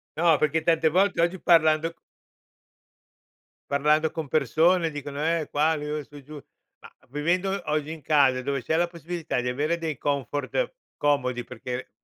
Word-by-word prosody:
No, 165 -1 +4
perché 155 +1 +1
tante 165 -1 +3
volte 185 +1 +2
oggi 175 +2 0
parlando 165 -1 +3 1.7
parlando 150 +2 +2
con 160 -3 -5
persone 160 +4 +2
dicono: 145 0 -6
"Eh 165 -2 0
qua, 155 +2 +2
io 150 0 -4
e 150 - -5
su 145 - -18
e 140 - -11
giù"; 150 +3 -11 0.4
ma - - -14 0.2
vivendo 180 +7 0
oggi 150 0 -1
in 160 -2 -8
casa, 135 -3 +3
dove 140 0 -2
c'è 160 - 0
la 175 0 +2
possibilità 170 -5 -4
di 125 - -2
avere 150 +6 0
dei 160 -3 -4
comfort 145 - -2 0.2
comodi, 125 -4 0
perché 125 0 -6
155 Hz, 160 wpm, -25 LUFS, 145-165 Hz, 1.7 s, No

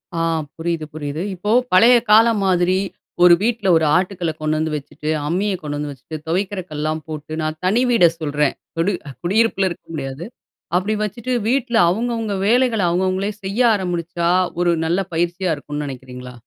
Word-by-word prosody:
ஆ - - -1 0.4
புரியுது, 165 -1 -2
புரியுது. 150 0 -4
இப்போ 205 +4 -3 0.2
பழைய 230 +7 +7 0.2
காலம் 225 -1 +5
மாதிரி, 180 0 +2 0.5
ஒரு 180 - +8
வீட்ல 225 -3 0
ஒரு 160 - +1
ஆட்டுக்கல்ல 180 -3 -2
கொண்டாந்து 155 +1 0
வச்சுட்டு, 150 +1 -6 0.2
அம்மிய 195 +5 0
கொண்டாந்து 145 -1 -4
வச்சுட்டு, 140 +4 -8
துவைக்கிற 190 +4 -1
கல்லுலாம் 155 +1 -2
போட்டு, 155 -1 -7
நான் 155 0 -3
தனி 215 +7 +3
வீட 225 -7 +6
சொல்றேன். 150 -2 0 0.2
தொடு 190 +4 +2 0.3
குடியிருப்பில 195 +1 +2
இருக்க 170 - -9
முடியாது. 135 +2 -5 0.5
அப்படி 195 +4 +1
வச்சுட்டு 235 +4 -3 0.2
வீட்ல 250 -2 0
அவுங்கவுங்க 225 +2 -1
வேலைகள 240 -2 +3
அவுங்கவுங்களே 185 +3 0
செய்ய 195 +4 -3 0.2
ஆரம்பிச்சா, 175 -2 -2 0.3
ஒரு 175 - +3
நல்ல 175 +4 +1
பயிற்சியா 175 +2 0
இருக்கும்னு 145 +1 -5
நினைக்கிறீங்களா? 125 -1 -9
175 Hz, 145 wpm, -20 LUFS, 155-205 Hz, 0.5 s, ஒரு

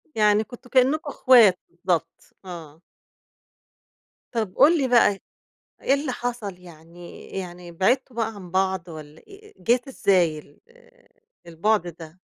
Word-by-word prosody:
يعني 210 -1 +3
كنتم 245 +2 -14
كإنّكم 270 +4 +2
إخوات 230 -10 +5
بالضبط، 175 -1 -3
آه. 165 -4 -10 1.5
طَب 220 -6 -3
قُل 310 +5 +5
لي 275 -4 0
بقى، 235 -5 +4 0.6
إيه - - +2
اللي 280 -1 -1
حصل؟ 240 -6 -5
يعني 170 0 -14
يعني 175 -2 -7
بعدتوا 245 +8 0
بقى 225 -1 -2
عن 185 -4 -11
بعض 190 -1 0
والّا 155 -3 -11
آآ 420 +1 -16
جات 245 +4 +1
إزاي 180 - +1
ال 145 -1 -19 0.9
البُعد 175 +3 0
ده؟ 165 0 -11
195 Hz, 125 wpm, -24 LUFS, 175-245 Hz, 1.5 s, إخوات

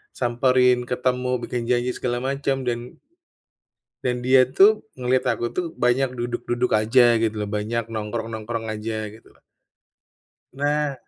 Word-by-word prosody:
samperin, 125 0 +2
ketemu, 125 0 -1
bikin 120 -1 -3
janji 125 0 +1
segala 120 -1 -2
macam. 135 0 -1
Dan 120 0 -4 1.1
dan 125 -1 0
dia 130 0 +6
tuh, 205 +10 +4
ngeliat 125 +1 +1
aku 120 -1 0
tuh, 180 - 0
banyak 125 +2 +1
duduk-duduk 120 +1 -2
aja 120 +2 +4
gitu, 110 -1 0
lho. 105 -1 -2
Banyak 110 +2 -2
nongkrong-nongkrong 110 +1 -4
aja, 110 0 -4
gitulah. 110 +1 -19 1.1
Nah, 145 +1 0
120 Hz, 125 wpm, -23 LUFS, 115-130 Hz, 1.1 s, dia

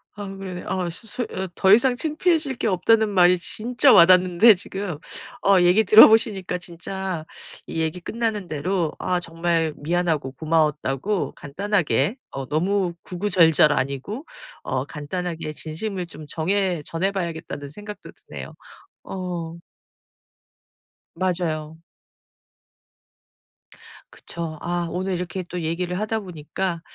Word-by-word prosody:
아유 195 -1 -7
그래 190 -1 -6
네 180 - -7
아 185 -2 -2
소 170 - -5
소 245 - -2
어 190 - -3
더 190 0 +3
이상 245 +3 +4
창피해질 310 -1 0
게 - - -2
없다는 220 +3 +3
말이 180 -2 +5
진짜 245 +8 +3
와닿는데 185 +4 +7
지금 190 -2 -5 0.5
어 195 -2 +6
얘기 180 +5 +5
들어 215 +2 +10
보시니까 205 -5 +2
진짜 180 0 -5 0.4
이 - - -4
얘기 160 +3 -2
끝나는 220 0 -3
대로 165 +2 -1
아 180 -1 0
정말 165 -2 -1
미안하고 160 -4 -1
고마웠다고 155 +4 0
간단하게 170 - 0
어 135 -1 -6
너무 180 +4 0
구구절절 170 -5 +3
아니고 140 - -3 0.4
어 130 0 -2
간단하게 160 +2 -5
진심을 175 +5 -4
좀 155 -2 -11
정해 180 +1 0
전해 185 +6 -1
봐야겠다는 165 -6 -5
생각도 205 +6 -10
드네요. - - -10 0.5
어. 175 -3 -5 1.6
맞아요. 165 -3 -2 2.3
그쵸. 165 -2 -7
아 175 0 -2
오늘 185 +2 -2
이렇게 180 +1 -4
또 180 -1 -3
얘기를 175 +3 -2
하다 220 +1 -1
보니까 175 -1 -4
180 Hz, 265 characters per minute, -23 LUFS, 160-200 Hz, 2.3 s, 들어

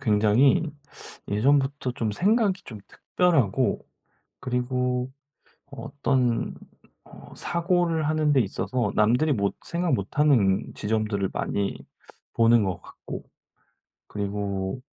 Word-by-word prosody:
굉장히 110 +8 +3 0.6
예전부터 135 +4 +1
좀 110 -3 -2
생각이 200 - +2
좀 110 -4 -9
특별하고 160 - 0 0.5
그리고 125 0 -1 0.6
어떤 135 -3 -1 0.5
어 - - -15
사고를 170 -3 0
하는 155 -1 +2
데 135 - +4
있어서 105 +2 -1
남들이 125 +9 +3
못 100 -5 0
생각 170 -3 -1
못 100 +3 -4
하는 115 -11 +3
지점들을 105 -2 -1
많이 100 -1 -2 0.6
보는 115 -1 +4
것 95 -3 -3
같고 - - -9 0.9
그리고 100 +1 -3
125 Hz, 215 characters per minute, -25 LUFS, 105-145 Hz, 0.9 s, 데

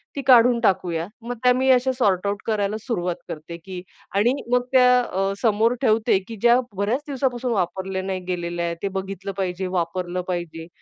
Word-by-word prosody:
ती 280 - -2
काढून 240 -1 +6
टाकूया. 180 -5 +1
मग 245 +1 -5
त्या 250 - +6
मी 260 +1 +1
अशा 255 +1 +3
सॉर्ट-आऊट 200 -3 +1
करायला 210 -1 0
सुरुवात 180 -8 -2
करते. 170 +4 -7 0.3
आणि 220 +5 +3 0.2
मग 250 0 +4
त्या 250 -1 +6
अ, 195 -4 -1
समोर 225 +1 +3
ठेवते, 220 -4 +3
की 225 - -7
ज्या 240 +1 +5 0.2
बऱ्याच 215 +7 0
दिवसापासून 255 -3 -1
वापरल्या 190 0 -2
नाही 190 -1 -3
गेलेल्या 175 -1 -2
आहेत, 170 0 -3
ते 200 - +1
बघितलं 195 0 -6
पाहिजे, 185 0 -2
वापरलं 180 0 -2
पाहिजे. 170 -2 -4
195 Hz, 165 wpm, -23 LUFS, 180-240 Hz, 0.3 s, काढून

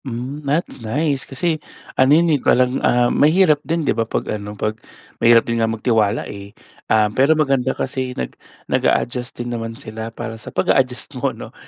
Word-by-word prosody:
Hmm, 130 +4 -5
that's 150 -3 -1
nice, 140 +5 -1
kasi 155 +3 -1 0.3
ano 130 0 +3
yan 170 -1 +3
eh 145 - +1
parang, 125 +1 +2
ah, 120 0 +3
mahirap 155 -1 +4
din 165 0 -2
'di - - +2
ba - - -1
pag 115 - -2
ano 105 0 -6
pag 110 +1 -1 0.5
mahirap 115 0 +6
din 115 -1 -1
nga 115 - +2
magtiwala 110 -1 +1
eh. 100 0 -10 0.3
Ah, 110 -1 +4
pero 140 +6 +4
maganda 135 -4 +2
kasi 130 -1 -3
nag 65 - -4 0.3
nag-a-adjust 125 0 0
din 120 0 -4
naman 115 -1 -5
sila 110 -4 -7
para 115 -1 -7
sa - - -8
pag-a-adjust 130 0 0
mo, - - +2
'no, - - -10
125 Hz, 180 wpm, -20 LUFS, 115-140 Hz, 0.5 s, mahirap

